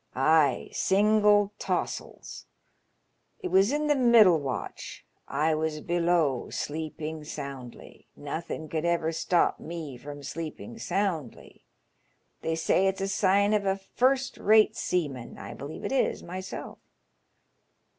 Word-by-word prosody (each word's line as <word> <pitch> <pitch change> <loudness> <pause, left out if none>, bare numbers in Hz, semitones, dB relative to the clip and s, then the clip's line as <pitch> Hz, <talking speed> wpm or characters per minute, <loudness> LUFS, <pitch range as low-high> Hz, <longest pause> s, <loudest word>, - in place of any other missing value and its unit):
" - - -37
Ay, 145 -2 +3
single 205 0 +3
taws'ls. - - -4 0.9
It 380 -5 -5
was 195 +5 +4
in 300 +1 0
the 300 - +4
middle 230 - +6
watch; 135 -3 -6 0.2
I 155 +3 +1
was 155 0 -1
below, 170 -5 +1
sleeping 155 0 -5
soundly. 140 -5 -9
Nothin' 160 +2 -5
could 155 +1 -3
ever 170 -1 +1
stop 165 +2 +1
ma 160 -6 -7
from 145 +1 -9
sleeping 165 - -7
soundly. 180 - -3 0.8
They 160 - -1
say 180 +4 +2
it's 190 0 -1
a 195 - 0
sign 200 +1 +3
of 205 -2 +1
a 195 0 +1
first 255 +7 0
rate 215 +1 +5
seaman. 145 - -2
I - - -8
believe 140 +3 -8
it - - -2
is 270 - 0
myself. 185 +2 -7
170 Hz, 125 wpm, -28 LUFS, 155-205 Hz, 0.9 s, middle